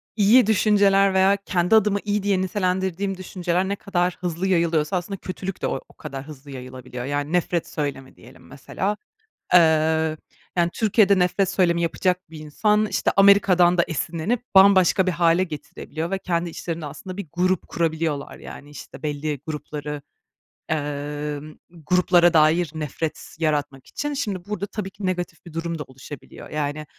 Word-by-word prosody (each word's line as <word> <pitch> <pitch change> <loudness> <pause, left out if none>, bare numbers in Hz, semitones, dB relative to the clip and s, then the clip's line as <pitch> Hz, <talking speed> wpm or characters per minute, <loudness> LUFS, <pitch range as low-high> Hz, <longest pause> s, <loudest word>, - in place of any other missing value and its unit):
iyi 215 +3 +5
düşünceler 200 -2 +4
veya 190 +1 +4
kendi 180 +3 +2
adıma 210 -2 +3
iyi 210 -1 -1
diye 200 -2 +1
nitelendirdiğim 190 0 -1
düşünceler 185 0 -2
ne 200 - 0
kadar 180 -3 -1
hızlı 175 +1 -2
yayılıyorsa 170 -2 +1
aslında 190 +3 -5
kötülük 185 0 -6
de - - 0
o - - -2
o - - -19
kadar 140 -2 -8
hızlı 145 -2 -11
yayılabiliyor. 125 -1 -8
Yani, 145 +3 -2
nefret 175 -1 0
söylemi 140 -3 -4
diyelim - - -17
mesela. 205 +2 -3 0.6
Eee, 160 -1 +4 0.4
yani, 175 -1 +2
Türkiye'de 205 -3 +3
nefret 180 +2 +2
söylemi 175 -3 +2
yapacak 180 +1 -1
bir 160 - -9
insan, 210 +8 +1
işte, - - 0
Amerika'dan 190 -3 +5
da - - +6
esinlenip 170 - -2
bambaşka 190 -1 +6
bir 185 - +1
hâle 170 +1 +3
getirebiliyor 160 0 -6
ve 195 - -1
kendi 175 -2 -2
içlerinde 165 -1 -5
aslında 185 +5 -8
bir 200 -3 -5
grup 185 +1 0
kurabiliyorlar 160 -3 -2
yani, 145 - -11
işte, 145 - -11
belli 150 -1 -3
grupları, 150 -1 -5 0.7
emm, 150 0 -4 0.3
gruplara 175 0 +4
dair 160 +1 +4
nefret 155 +1 -5
yaratmak 145 -4 -1
için. 295 0 -4
Şimdi 205 -10 -3
burada 205 -1 -3
tabii 205 -1 -5
ki 195 0 -8
negatif 180 -2 -3
bir 170 - -11
durum 165 0 -3
da - - -3
oluşabiliyor. 130 +1 -11
Yani, 150 0 -3
175 Hz, 155 wpm, -23 LUFS, 155-190 Hz, 0.7 s, da